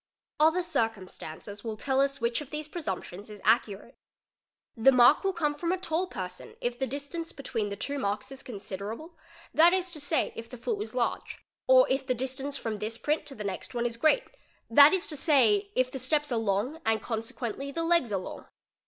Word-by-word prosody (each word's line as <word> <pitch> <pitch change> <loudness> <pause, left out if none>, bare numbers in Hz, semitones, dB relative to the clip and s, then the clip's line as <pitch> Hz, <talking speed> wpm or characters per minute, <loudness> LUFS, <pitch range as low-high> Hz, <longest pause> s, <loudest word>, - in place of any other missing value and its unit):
Other 320 +4 +4
circumstances 205 - -3
will 220 -2 -4
tell 265 +3 +1
us 275 0 +1
which 235 +3 0
of 290 - -9
these 300 0 -5
pre 345 +3 -6
"sumptions 190 - -5
is 210 -1 -10
accurate. 220 +1 +1 0.8
The 235 +3 +6
mark 250 +6 +6
will 390 - +2
come 315 -5 0
from 335 +4 -2
a 375 - +1
tall 360 0 -1
person 185 - -7
if 240 0 -2
the 265 - 0
'distance 290 +5 -4
between 230 -7 -3
the 200 - -4
two 280 +7 -3
marks 215 +4 -2
is 270 0 -7
considerable, 220 - -7 0.4
that 340 +3 +6
is 370 -1 0
to 315 - -1
say, 290 +3 0
if 230 0 -8
the 250 - -9
foot 415 - -2
was 420 - -5
large; - - -1 0.3
or - - +7
if 265 0 -1
the 255 - +1
distance 265 +3 -3
from 225 -4 -3
this 215 +2 -3
print 300 +5 -1
to 275 - -8
the 210 - -6
next 200 +5 -5
one 240 0 0
is 235 -1 -1
great, 310 - +3 0.5
'that 285 +5 +9
is 380 0 +1
to 310 - -3
say, 340 +8 +3
if 255 0 +2
the 265 - -4
steps 295 +3 0
are 235 - +1
long 225 +9 -1
and 225 -3 +1
consequently 235 +3 -4
the 330 +3 -2
legs 330 -8 +2
are 200 - +1
long. 185 - -7
265 Hz, 210 wpm, -29 LUFS, 225-310 Hz, 0.8 s, that